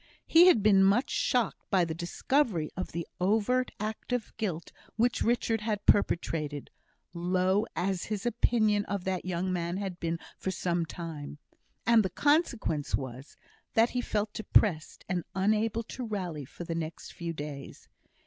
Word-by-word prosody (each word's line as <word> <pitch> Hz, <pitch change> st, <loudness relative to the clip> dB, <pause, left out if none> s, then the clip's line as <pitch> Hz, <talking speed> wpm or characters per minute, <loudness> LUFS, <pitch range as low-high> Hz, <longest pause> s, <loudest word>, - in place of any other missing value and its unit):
He 340 Hz, +2 st, +7 dB
had 230 Hz, -, +5 dB
been 195 Hz, -2 st, +6 dB
much 205 Hz, +7 st, +3 dB
shocked 245 Hz, -4 st, +1 dB
by 185 Hz, -3 st, +3 dB
the 165 Hz, -, -3 dB
discovery 175 Hz, -, 0 dB
of 185 Hz, -, -4 dB
the 170 Hz, -1 st, -4 dB
overt 220 Hz, +7 st, +2 dB
act 215 Hz, +4 st, -5 dB
of 245 Hz, -3 st, -2 dB
guilt 180 Hz, -7 st, -3 dB, 0.2 s
which 240 Hz, +2 st, +1 dB
Richard 230 Hz, -1 st, +1 dB
had 210 Hz, -2 st, -2 dB
perpetrated, 150 Hz, -7 st, +1 dB, 0.4 s
low 185 Hz, +4 st, +1 dB
as 190 Hz, -1 st, -1 dB
his 210 Hz, -1 st, -4 dB
opinion 215 Hz, -3 st, +2 dB
of 200 Hz, -2 st, -3 dB
that 185 Hz, -1 st, -2 dB
young 185 Hz, 0 st, -1 dB
man 175 Hz, 0 st, -2 dB
had 190 Hz, -3 st, -4 dB
been 165 Hz, 0 st, -1 dB, 0.2 s
for -, -, -2 dB
some 175 Hz, -2 st, -1 dB
time; 155 Hz, -4 st, -7 dB, 0.5 s
and 230 Hz, -1 st, +6 dB
the 190 Hz, -, -1 dB
consequence 240 Hz, -, +1 dB
was, 130 Hz, +1 st, -7 dB, 0.4 s
that 225 Hz, +2 st, +4 dB
he 250 Hz, -, -1 dB
felt 210 Hz, -3 st, -2 dB
depressed, 190 Hz, -6 st, +1 dB
and 180 Hz, -2 st, -1 dB
unable 215 Hz, +3 st, +1 dB
to 250 Hz, +3 st, -7 dB
rally 180 Hz, -9 st, -4 dB
for 175 Hz, -, -9 dB
the 165 Hz, -, -4 dB
next 165 Hz, -1 st, -5 dB
few 170 Hz, -1 st, -4 dB
days. 145 Hz, -3 st, -8 dB
190 Hz, 160 wpm, -29 LUFS, 170-220 Hz, 0.5 s, He